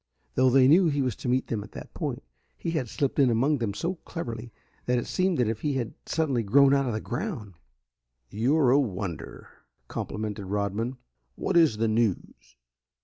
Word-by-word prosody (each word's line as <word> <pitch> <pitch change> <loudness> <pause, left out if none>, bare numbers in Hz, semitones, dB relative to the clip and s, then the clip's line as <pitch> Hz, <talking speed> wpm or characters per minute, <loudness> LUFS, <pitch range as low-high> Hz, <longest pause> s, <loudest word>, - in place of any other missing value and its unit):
Though 130 0 +4
they 130 0 +6
knew 170 +5 +6
he 145 -3 +1
was 125 -5 -1
to - - -4
meet 130 +1 +2
them 110 -3 -3
at 105 - -14
that - - -9
point, - - -4 0.3
he 165 - -3
had 135 -8 -2
slipped 140 +4 -1
in 135 -3 +5
among 130 +5 +2
them 105 -4 -2
so 175 - -2
cleverly 120 -8 -6 0.4
that 125 0 +2
it 120 - -1
seemed 185 -4 0
as 120 - +3
if 110 0 -2
he 145 - 0
had 125 -4 -2
suddenly 140 -7 0
grown 135 +6 +5
out 140 -1 +2
of 120 - -1
the 110 - -1
ground. 120 - -4 0.8
"You're 130 +5 +3
a 140 - +5
wonder," 95 - -4 0.4
complimented 105 -1 -4
Rodman. 105 +5 -2 0.4
"What - - -2
is 160 -10 +5
the 115 +1 +1
news?" 110 - -1
125 Hz, 190 wpm, -27 LUFS, 110-140 Hz, 0.8 s, they